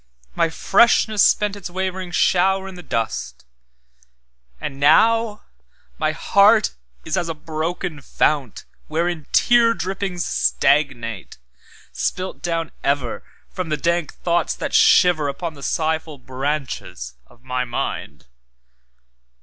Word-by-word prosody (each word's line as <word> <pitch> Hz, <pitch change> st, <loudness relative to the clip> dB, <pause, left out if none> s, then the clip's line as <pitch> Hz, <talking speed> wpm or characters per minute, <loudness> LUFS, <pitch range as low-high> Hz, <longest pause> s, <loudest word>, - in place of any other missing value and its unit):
My 165 Hz, -, +1 dB
freshness 215 Hz, +4 st, +3 dB
spent 210 Hz, -1 st, +3 dB
its 200 Hz, -2 st, -7 dB
wavering 185 Hz, 0 st, -3 dB
shower 190 Hz, +2 st, +2 dB
i' -, -, -7 dB
the 180 Hz, -1 st, -10 dB
dust; 115 Hz, -, -4 dB, 1.1 s
And 135 Hz, -, -6 dB
now 225 Hz, +8 st, +3 dB, 0.6 s
my -, -, +1 dB
heart -, -, +4 dB, 0.3 s
is 160 Hz, -, -2 dB
as 175 Hz, -2 st, -1 dB
a 165 Hz, -, -3 dB
broken 160 Hz, +1 st, -4 dB
fount, 140 Hz, -2 st, -1 dB, 0.2 s
Wherein 165 Hz, -1 st, -2 dB
tear 235 Hz, -1 st, +4 dB
drippings 190 Hz, -1 st, -3 dB
stagnate, 120 Hz, -, 0 dB, 0.5 s
spilt 185 Hz, +1 st, -3 dB
down 165 Hz, -2 st, -2 dB
everFrom 140 Hz, +5 st, -4 dB
the 150 Hz, -, 0 dB
dank 170 Hz, 0 st, 0 dB
thoughts 170 Hz, -1 st, 0 dB
that -, -, -4 dB
shiverUpon 160 Hz, -2 st, +3 dB
the 140 Hz, -, -14 dB
sighful 160 Hz, 0 st, -2 dB
branches 130 Hz, -, -4 dB
of 120 Hz, +1 st, -23 dB
my 125 Hz, 0 st, -2 dB
mind. 75 Hz, -, -5 dB
165 Hz, 110 wpm, -21 LUFS, 140-185 Hz, 1.1 s, heart